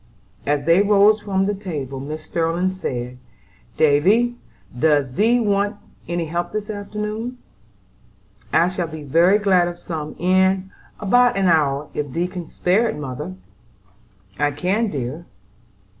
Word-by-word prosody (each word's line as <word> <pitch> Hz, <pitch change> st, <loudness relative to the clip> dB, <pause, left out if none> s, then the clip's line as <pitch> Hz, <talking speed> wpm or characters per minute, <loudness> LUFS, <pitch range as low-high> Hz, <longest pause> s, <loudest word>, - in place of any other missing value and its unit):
As 145 Hz, 0 st, +1 dB
they 170 Hz, +4 st, +5 dB
rose 205 Hz, +1 st, +4 dB
from 195 Hz, -2 st, 0 dB
table, 140 Hz, -9 st, -5 dB
Mrs. 150 Hz, +3 st, -5 dB
Sterling 170 Hz, +3 st, -1 dB
said: 125 Hz, -9 st, -5 dB, 0.6 s
"Davy, 190 Hz, +12 st, +3 dB, 0.4 s
does 145 Hz, -4 st, +2 dB
thee 225 Hz, -, +3 dB
want 205 Hz, -1 st, +1 dB, 0.3 s
any 170 Hz, 0 st, -2 dB
help 175 Hz, +2 st, -3 dB
this 215 Hz, 0 st, -3 dB
afternoon?" 210 Hz, +4 st, -5 dB, 1.1 s
"I 170 Hz, -, +4 dB
shall 180 Hz, -2 st, -3 dB
be 160 Hz, -1 st, -8 dB
very 170 Hz, +8 st, +4 dB
glad 190 Hz, -4 st, +3 dB
of 175 Hz, 0 st, -5 dB
some 155 Hz, -3 st, -6 dB
in 190 Hz, +1 st, +2 dB, 0.3 s
about 245 Hz, +3 st, +3 dB
an 195 Hz, -, +1 dB
hour 150 Hz, -4 st, +2 dB
if 145 Hz, -3 st, -4 dB
thee 170 Hz, +1 st, 0 dB
can 180 Hz, -2 st, -6 dB
spare 210 Hz, +6 st, +1 dB
it, -, -, -4 dB
mother." 150 Hz, +5 st, -6 dB, 1.0 s
"I 145 Hz, -, +3 dB
can, 185 Hz, +10 st, 0 dB
dear." 145 Hz, +3 st, -5 dB
175 Hz, 135 wpm, -21 LUFS, 150-205 Hz, 1.1 s, they